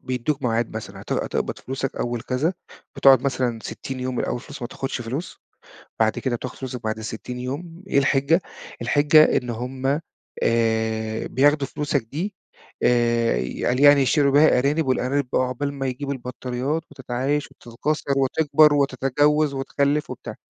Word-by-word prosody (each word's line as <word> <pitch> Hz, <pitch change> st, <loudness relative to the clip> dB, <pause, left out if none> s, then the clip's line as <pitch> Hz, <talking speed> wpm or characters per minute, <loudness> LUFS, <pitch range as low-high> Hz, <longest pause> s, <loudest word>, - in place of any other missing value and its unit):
بيدّوك 130 Hz, +3 st, -2 dB
ميعاد 115 Hz, -2 st, -1 dB
مثلًا -, -, -7 dB
هت -, -, -5 dB
هتقبض -, -, -2 dB
فلوسك 135 Hz, 0 st, -4 dB
أول 120 Hz, -1 st, -2 dB
كذا، 145 Hz, +8 st, -1 dB, 0.4 s
بتقعد 135 Hz, -2 st, +6 dB
مثلًا 125 Hz, -3 st, -1 dB
60 130 Hz, -1 st, -6 dB
يوم 130 Hz, 0 st, -2 dB
من -, -, 0 dB
أول -, -, -2 dB
الفلوس 140 Hz, +2 st, -9 dB
ما 120 Hz, -, -3 dB
تاخدش 135 Hz, -1 st, -4 dB
فلوس، 135 Hz, +9 st, -5 dB, 0.6 s
بعد 110 Hz, -1 st, +2 dB
كده 130 Hz, -3 st, -1 dB
بتاخد 130 Hz, +1 st, -7 dB
فلوسك 130 Hz, -2 st, -6 dB
بعد 110 Hz, 0 st, -2 dB
60 115 Hz, +3 st, -6 dB
يوم 165 Hz, +8 st, -6 dB
إيه -, -, +1 dB
الحجّة؟ 140 Hz, +5 st, +2 dB, 0.4 s
الحجّة 145 Hz, +5 st, +5 dB
إن 125 Hz, -, -3 dB
هم 130 Hz, +4 st, -2 dB, 0.4 s
آآ 110 Hz, -1 st, 0 dB
بياخدوا 145 Hz, +1 st, +3 dB
فلوسك 145 Hz, 0 st, -1 dB
دي 170 Hz, -, -5 dB, 0.5 s
آآ 120 Hz, -1 st, +3 dB, 0.3 s
قال 125 Hz, +1 st, +1 dB
يعني 145 Hz, -1 st, +7 dB
يشتروا 140 Hz, +1 st, +3 dB
بيها 145 Hz, -2 st, +5 dB
أرانب 145 Hz, +4 st, +1 dB
والأرانب 130 Hz, +2 st, 0 dB
بقى -, -, +3 dB
عقبال 130 Hz, +3 st, -3 dB
ما 135 Hz, -1 st, -3 dB
يجيبوا 140 Hz, +2 st, -3 dB
البطاريات 130 Hz, +4 st, -3 dB
وتتعايش 135 Hz, +1 st, -2 dB
وتتكاثر 140 Hz, +5 st, -3 dB
وتكبر 150 Hz, +2 st, +4 dB
وتتجوز 145 Hz, +2 st, +2 dB
وتخلّف 140 Hz, +2 st, 0 dB
وبتاع، -, -, -7 dB
135 Hz, 150 wpm, -23 LUFS, 120-145 Hz, 0.6 s, يعني